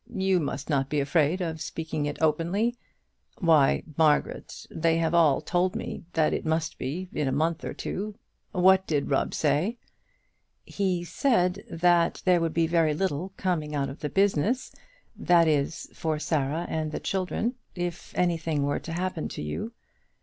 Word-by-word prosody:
You 190 -1 +2
must 145 -2 -3
not 135 -3 0
be 150 - 0
afraid 150 +5 +2
of 160 -3 -3
speaking 160 -2 -3
of 145 - -3
it - - -13
openly. 175 +10 +1 0.6
Why, 160 -6 +4
Margaret, 155 -2 +1
they 165 0 +1
have 165 0 0
all 165 -5 +4
told 180 +1 0
me - - -5
that 160 -1 +2
it - - -2
must 160 0 -1
be 165 +9 -3
in 150 - -1
a - - +1
month 160 +4 0
or - - -5
two. 210 +2 -4 0.4
What 190 +1 +4
did 145 -2 -1
Rubb 135 - +1
say?" 160 - +1 0.9
"He 185 -3 -1
said 180 -2 +1
that 170 0 +2
there 180 -2 +4
would 165 -1 -1
be 165 0 +3
very 160 -2 +2
little 185 +1 -2
coming 155 -5 -1
out 140 -1 0
of 135 - -9
the 150 - -3
business 200 - +1 0.4
that 170 -2 +4
is, 150 0 0
for 160 -1 -2
Sarah 155 +1 -1
and 155 -1 -2
the - - -3
children 195 +5 -1 0.2
if 175 -1 -4
anything 165 -4 +1
were 145 0 0
to 165 - -7
happen 180 -1 -2
to - - -7
you." 75 - -4
165 Hz, 170 wpm, -27 LUFS, 150-180 Hz, 0.9 s, Why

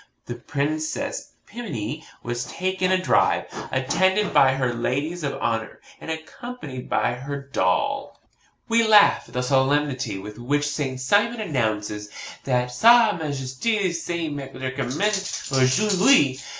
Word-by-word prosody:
'The 120 - -5
Princess 155 - -3
Pimminy 150 - -5 0.2
was 120 0 -3
taken 185 0 -1
a 185 - +4
drive, 185 - +2 0.3
attended 185 +10 +1
by 135 -1 +6
her 130 -2 0
ladies 140 +9 -2
of 140 - -2
honour, 115 -1 -2 0.2
and - - -9
accompanied 160 - -7
by - - +1
her 140 +3 -5
doll,' 135 -10 -1
&c. - - -39 0.4
We 230 0 +3
laugh 210 -2 +6
at - - -16
the 125 - 0
solemnity 135 -1 +1
with 105 +3 -9
which 145 +4 0
Saint 140 -3 -3
Simon 205 - +2
announces 110 - -2 0.4
that 125 -2 0
SA 230 - +6
MAJESTE 155 - -1
SE 170 -1 -3
MEDICAMENTE 135 -2 -5 0.6
AUJOURD'HUI. 140 - +4
140 Hz, 125 wpm, -23 LUFS, 125-185 Hz, 0.6 s, by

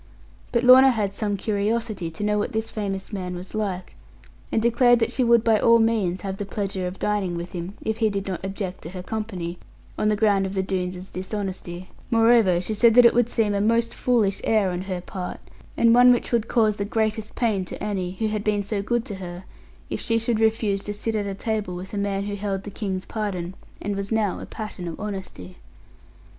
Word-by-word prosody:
But 235 0 +1
Lorna 260 +2 +9
had 210 -6 0
some 205 -1 -2
curiosity 210 -2 -1
to 165 +5 -6
know 210 0 +1
what 245 +4 -2
this 220 0 -2
famous 195 -1 -4
man 180 -2 -4
was 180 +1 -8
like, 195 -4 -3 0.6
and - - +2
declared 240 +2 +4
that 225 - 0
she 255 - +1
would 235 -1 +5
by 225 -2 +4
all 230 +2 +6
means 220 -6 +1
have 195 -1 -4
the 205 - -3
pleasure 195 -3 -3
of 180 +1 -6
dining 200 -4 -1
with 170 +1 -6
him, 180 +2 -6
if 220 0 -1
he 225 -1 +2
did 200 -1 -3
not 190 -2 -4
object 195 -1 -4
to 165 - -7
her 180 0 -7
company 185 -6 -4 0.4
on 215 - +2
the 210 - +2
ground 205 -2 +2
of 190 - -6
the 190 - +1
Doones' 185 -1 -3
dishonesty; 185 -2 -5 0.2
moreover, 225 -6 +5
she 185 +5 -3
said 225 +1 +4
that 245 -1 +8
it 235 - +7
would 240 0 +2
seem 220 -4 +1
a 200 - +1
most 230 +2 +2
foolish 220 -6 +1
air 210 -4 +2
on 180 0 -3
her 185 -2 -4
part, 180 0 -6 0.4
and 230 0 +5
one 245 +1 +8
which 245 - +1
would 230 -2 +1
cause 215 -3 +2
the 200 - -1
greatest 215 +1 -1
pain 215 -6 +1
to - - -7
Annie, 190 -3 -2
who 220 - 0
had 215 -1 -2
been 210 -1 +1
so 200 0 -2
good 235 +3 -1
to 205 - -5
her, 180 -1 -7 0.5
if - - -2
she 230 - +1
should 225 0 0
refuse 220 -3 +1
to 205 - -4
sit 225 +2 -2
at 200 -2 -2
table 210 -5 -2
with 185 +3 -8
a - - -3
man 200 -1 -1
who 205 0 -4
held 200 -1 -3
the 205 - -7
King's 190 -3 -3
pardon, 190 -5 -3 0.3
and 205 0 -3
was 200 +1 -4
now 215 -4 +1
a - - -8
pattern 210 -5 -6
of 165 - -6
honesty. 190 - -6
205 Hz, 220 wpm, -24 LUFS, 190-225 Hz, 0.6 s, Lorna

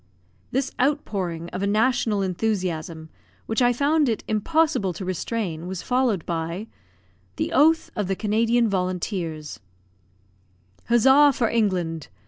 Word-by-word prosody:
This 270 +1 -1
outpouring 190 - -1
of 185 - -5
a 200 - 0
national 215 -1 +1
enthusiasm, 175 -5 -2 0.4
which 225 +3 -1
I 245 0 +5
found 290 +3 +2
it 225 - -2
impossible 220 - +1
to 185 +3 -6
restrain, 185 -2 -3
was 185 -1 -5
followed 245 -8 0
by 170 +4 -3 0.7
THE - - -2
OATH 320 +4 +4
OF 205 -3 -2
THE 195 - 0
CANADIAN 230 +3 +2
VOLUNTEERS 180 -5 -3 1.3
Huzza 265 +5 +6
for 230 -3 +1
England! 180 -8 -1
210 Hz, 120 wpm, -24 LUFS, 180-245 Hz, 1.3 s, Huzza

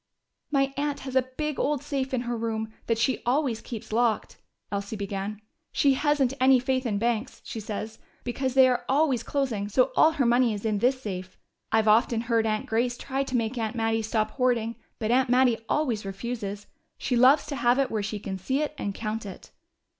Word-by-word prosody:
"My 275 -2 +1
aunt 290 0 -1
has 265 -1 -6
a 260 - +6 0.2
big 300 -2 -2
old 290 -1 0
safe 275 -2 -2
in 255 -2 0
her 240 0 -3
room, 220 -1 -3
that 230 - +1
she 240 +3 +1
always 250 -2 +1
keeps 220 -2 -7
locked," 230 -1 +1 0.3
Elsie 200 +1 -3
began. 200 0 -4 0.3
"She 280 -1 +4
hasn't 280 -2 +2
any 260 0 +7
faith 260 0 0
in 205 -3 0
banks, 235 +2 -1
she 225 - -5
says, 215 +1 -5 0.2
because 260 +1 -2
they 265 -1 +8
are 245 -1 +1
always 270 -3 +3
closing, 235 -7 -2
so 250 +4 +3
all 320 +1 +5
her 280 -5 +1
money 240 -1 +3
is 205 - -7
in 215 -2 +1
this 255 +4 +2
safe. 185 -6 -6 0.3
I've 220 0 +3
often 225 +1 +4
heard 230 -1 +1
Aunt 215 0 -1
Grace 240 +2 0
try 270 +1 -2
to 260 -2 -1
make 230 +2 -2
Aunt 220 0 -2
Mattie 225 -1 +1
stop 215 0 -1
hoarding, 240 -3 0 0.2
but 220 0 -1
Aunt 255 0 +3
Mattie 250 -2 +4
always 250 -9 0
refuses. 205 0 -5 0.3
She 250 - -1
loves 260 +5 +6
to 285 - -4
have 245 -1 +3
it 275 -2 +1
where 220 -2 0
she 210 +1 -3
can 195 -2 -5
see 265 +10 0
it 300 - -3
and 200 -1 -3
count 220 0 -3
it." 195 -3 -10
240 Hz, 205 wpm, -27 LUFS, 215-265 Hz, 0.3 s, they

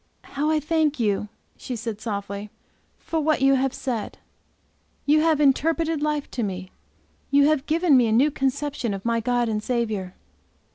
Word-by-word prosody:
"How 290 +2 -2
I 315 -1 +2
thank 305 -1 0
you," 210 -2 0 0.3
she 250 - -5
said 225 -2 -5
softly, 200 -1 -4 0.5
"for 325 - -3
what 310 +1 +2
you 270 0 +5
have 270 0 +1
said. 240 -6 -4 0.9
You 305 +1 +4
have 320 -2 +2
interpreted 315 +2 +2
life 300 -1 -1
to 245 - -3
me! 185 -3 -4 0.6
You 280 0 +5
have 295 -2 +1
given 325 -1 +3
me 245 -3 +5
a - - 0
new 265 +7 +4
conception 270 -4 -2
of 195 - -9
my 230 0 +1
God 245 +1 0
and 215 -1 -1
Saviour!" 215 -6 -2
265 Hz, 170 wpm, -24 LUFS, 220-300 Hz, 0.9 s, you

